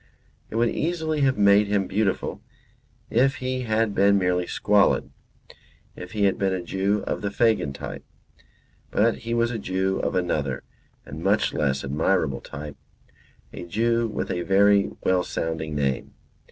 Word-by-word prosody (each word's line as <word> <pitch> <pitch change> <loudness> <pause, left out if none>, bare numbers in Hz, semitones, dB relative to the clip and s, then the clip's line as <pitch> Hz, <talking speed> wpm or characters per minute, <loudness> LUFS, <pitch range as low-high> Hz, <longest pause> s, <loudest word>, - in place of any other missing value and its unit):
It - - -8
would 115 +1 +2
easily 160 -2 -1
have 135 -1 +2
made 100 0 +5
him 100 -1 +1
beautiful 100 0 -1 0.7
if 135 +4 +3
he 130 0 -3
had 110 -1 +1
been 100 +1 +4
merely 90 -1 0
squalid; 105 -1 +2 0.8
if 90 +3 -9
he 105 -2 0
had 95 -1 +2
been 95 -1 +1
a 90 - -4
Jew 100 +3 -1
of - - -3
the 100 - -1
Fagin 110 -8 +1
type. - - -7 0.9
But 115 +2 +1
he 115 +1 -3
was 115 0 +1
a 115 - -3
Jew 95 0 -1
of - - -2
another 75 -7 -1 0.4
and - - -8
much - - +2
less 70 -3 0
admirable 75 +1 0
type; 75 +1 -8 0.8
a - - -7
Jew 115 +6 0
with 110 - -4
a 90 - -2
very 100 +2 +4
well 90 -1 +2
sounding 80 -3 -3
name. 70 -2 -2
100 Hz, 155 wpm, -24 LUFS, 90-115 Hz, 0.9 s, made